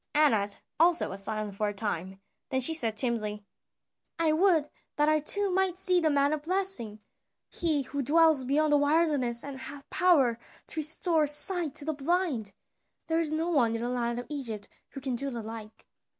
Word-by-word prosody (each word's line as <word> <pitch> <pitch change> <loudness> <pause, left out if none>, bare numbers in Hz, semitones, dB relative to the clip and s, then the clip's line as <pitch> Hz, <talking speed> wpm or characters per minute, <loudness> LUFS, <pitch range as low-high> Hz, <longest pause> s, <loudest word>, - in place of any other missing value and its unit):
Anat 220 -10 +2 0.2
also 340 +1 +3
was 195 +1 -3
silent 215 -1 -3
for 210 +1 -1
a 205 - -7
time, 190 -2 -4 0.3
then 260 - 0
she 260 +5 -1
said 225 -8 -2
timidly: 215 -4 -3 0.7
"I 330 -2 +3
would 325 -2 +3 0.3
that 295 0 +2
I 310 0 +3
too 400 +6 +3
might 375 -1 0
see 365 -1 +3
the 320 -2 +1
man 285 0 +2
of 305 - -3
blessing, 320 - -2 0.5
he 310 -5 0
who 280 +2 -4
dwells 315 0 +4
beyond 295 +4 +1
the - - +6
wilderness 290 -5 +1
and 275 -2 -8
hath 275 +1 -9
power 280 -11 +3 0.3
to 315 - -3
restore 315 0 +3
sight 315 +1 +3
to 285 - +1
the 315 - -1
blind. 285 - -1 0.5
There 325 0 0
is 320 -2 +1
no 325 +2 -1
one 235 -8 +2
in 230 - -4
the 240 - -2
land 240 -1 -2
of 245 - -5
Egypt 235 -9 -5 0.2
who 275 - -9
can 260 -2 -2
do 275 +3 -3
the 235 -4 -6
like." 220 0 -10
285 Hz, 190 wpm, -28 LUFS, 235-320 Hz, 0.7 s, the